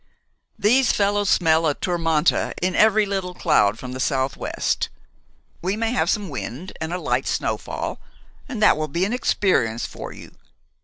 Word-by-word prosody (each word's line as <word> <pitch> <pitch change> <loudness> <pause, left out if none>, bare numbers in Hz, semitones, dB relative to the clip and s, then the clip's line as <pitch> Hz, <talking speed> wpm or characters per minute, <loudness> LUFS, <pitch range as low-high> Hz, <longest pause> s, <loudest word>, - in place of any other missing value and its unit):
"These 245 +5 +4
fellows 205 0 +1
smell 160 -2 +3
a 145 - +1
tourmente 165 -3 +1
in 185 0 0
every 215 0 +4
little 190 -2 -3
cloud 110 -12 +3
from 125 +1 -7
the 130 - -6
southwest. 135 0 -1 0.7
We 190 +4 -1
may 225 0 0
have 250 - +1
some 210 -3 0
wind 140 +5 -6
and 160 +1 -3
a 180 - -1
light - - -1
snowfall, - - -3 0.5
and 225 -5 -2
that - - +6
will 155 0 -2
be 170 +6 0
an 210 - -2
experience 125 - +1
for - - -8
you. - - -12
180 Hz, 160 wpm, -22 LUFS, 150-205 Hz, 0.7 s, that